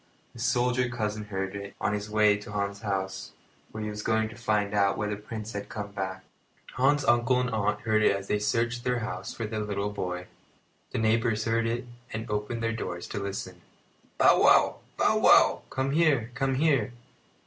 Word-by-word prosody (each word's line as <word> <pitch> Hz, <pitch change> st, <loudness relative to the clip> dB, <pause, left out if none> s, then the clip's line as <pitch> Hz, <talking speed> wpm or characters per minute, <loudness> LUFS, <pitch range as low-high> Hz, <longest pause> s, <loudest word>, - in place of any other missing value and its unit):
The -, -, -12 dB
soldier 125 Hz, +1 st, +1 dB
cousin 110 Hz, -3 st, -3 dB
heard 95 Hz, -1 st, -4 dB
it, 100 Hz, 0 st, -7 dB
on 105 Hz, -1 st, 0 dB
his 105 Hz, 0 st, -3 dB
way 105 Hz, -1 st, +4 dB
to 105 Hz, 0 st, -8 dB
Hans's 100 Hz, -1 st, -3 dB
house, 95 Hz, -2 st, -3 dB, 0.4 s
where 110 Hz, 0 st, -5 dB
he 105 Hz, -, -3 dB
was 105 Hz, 0 st, -5 dB
going 110 Hz, 0 st, +1 dB
to 110 Hz, -, -11 dB
find 105 Hz, -3 st, 0 dB
out 100 Hz, -1 st, +2 dB
whether 105 Hz, -1 st, -1 dB
Prince 105 Hz, +1 st, -7 dB
had 100 Hz, 0 st, -5 dB
come 105 Hz, -1 st, -5 dB
back. 95 Hz, -2 st, -4 dB, 0.5 s
Hans's 145 Hz, +3 st, +2 dB
uncle 120 Hz, +1 st, +4 dB
and 125 Hz, 0 st, -1 dB
aunt 105 Hz, -1 st, 0 dB
heard 110 Hz, -2 st, +2 dB
it 105 Hz, -, +4 dB
as 100 Hz, 0 st, -6 dB
they 105 Hz, -, +1 dB
searched 115 Hz, +3 st, 0 dB
through 125 Hz, -1 st, +1 dB
the -, -, -1 dB
house 95 Hz, -3 st, -5 dB
for 115 Hz, -, -3 dB
their 110 Hz, 0 st, -3 dB
little 105 Hz, -1 st, -2 dB
boy. 90 Hz, -3 st, -4 dB, 0.6 s
The -, -, -4 dB
neighbours 110 Hz, 0 st, +1 dB
heard 115 Hz, 0 st, +1 dB
it, 120 Hz, +2 st, -2 dB, 0.3 s
and 110 Hz, +1 st, -4 dB
opened 105 Hz, +3 st, -2 dB
their 115 Hz, 0 st, 0 dB
doors 85 Hz, -6 st, -5 dB
to -, -, -3 dB
listen. 95 Hz, -2 st, -5 dB, 0.6 s
"Bow -, -, +5 dB
wow! -, -, +5 dB, 0.2 s
Bow -, -, +3 dB
wow! -, -, +6 dB
Come 130 Hz, +1 st, -1 dB
here! 145 Hz, -7 st, +2 dB
Come 135 Hz, 0 st, 0 dB
here!" 135 Hz, -6 st, +2 dB
110 Hz, 195 wpm, -28 LUFS, 100-120 Hz, 0.6 s, wow